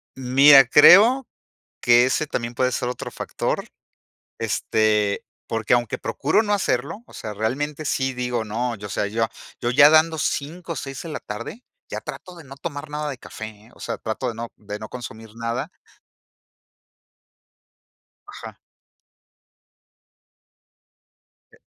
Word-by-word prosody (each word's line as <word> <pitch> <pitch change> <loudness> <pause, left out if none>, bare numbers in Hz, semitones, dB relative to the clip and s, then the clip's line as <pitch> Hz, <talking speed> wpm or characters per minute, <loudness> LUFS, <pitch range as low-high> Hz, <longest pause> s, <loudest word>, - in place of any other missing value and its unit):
Mira, 135 +1 +7
creo 215 - +7 0.5
que 120 0 +5
ese 150 +3 0
también 120 -3 -3
puede 130 +1 0
ser 125 -1 -1
otro 125 - -6
factor, - - -3 0.7
este, 105 -2 +1 0.2
porque, 115 +1 +1
aunque 120 -3 -1
procuro 160 +10 0
no 205 - -1
hacerlo, 165 - -1
o - - -16
sea, 105 -1 -7
realmente 145 +8 -2
sí 135 -2 -1
digo: 125 -2 -2
"No", 115 +2 -2
yo, 105 +1 -8
o - - -9
sea, 100 +2 -1
yo 115 +2 0
a - - -5 0.3
yo 120 - 0
ya 145 +3 +8
dando 160 +1 +4
5 165 +4 -3
o 160 - -7
6 135 +3 -6
en 160 - -6
la - - -3
tarde, 115 - -8 0.3
ya - - -4
trato 180 -1 -9
de 165 - -12
no 135 0 -11
tomar 145 -1 -6
nada 150 0 -3
de 130 - -7
café, 110 - -8
¿eh? 110 +2 -14
O - - -20
sea, - - -4
trato 110 +4 -3
de 115 - -4
no 115 0 -6
de 105 0 -7
no 110 0 -8
consumir 115 -3 -9
nada 115 +8 -4 2.6
Ajá. 410 - -10 3.0
Eh - - -22
125 Hz, 150 wpm, -23 LUFS, 115-150 Hz, 3.0 s, ya